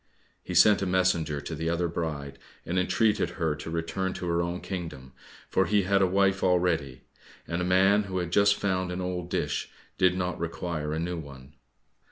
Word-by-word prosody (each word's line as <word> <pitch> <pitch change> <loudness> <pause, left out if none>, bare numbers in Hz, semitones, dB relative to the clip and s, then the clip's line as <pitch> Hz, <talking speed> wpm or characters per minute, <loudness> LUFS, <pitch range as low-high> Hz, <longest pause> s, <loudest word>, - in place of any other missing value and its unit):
He 90 - -6
sent 100 +3 +6
a 95 - 0
messenger 90 -5 +1
to 80 - -6
the 80 +1 -2
other 85 +1 0
bride, 75 -5 -4 0.3
and 90 +2 0
entreated 105 +4 +2
her 80 -4 +1
to 75 - -7
return 85 +3 -2
to - - -6
her 85 0 +1
own 85 +1 -2
kingdom, 80 -9 -6 0.3
for - - +1
he 105 +1 +3
had 100 +1 +2
a 95 - +4
wife 95 +1 +2
already, 85 -8 +1 0.4
and 85 +1 -2
a - - 0
man 95 +3 +4
who 95 -1 -4
had 90 -2 -2
just 100 +1 +4
found 95 -2 -1
an 90 - -4
old 90 -1 -3
dish - - -2 0.3
did 90 0 +4
not 90 -1 -2
require 85 -2 -3
a 80 - -2
new 85 +1 -3
one. 70 -2 -11
90 Hz, 195 wpm, -27 LUFS, 80-95 Hz, 0.4 s, sent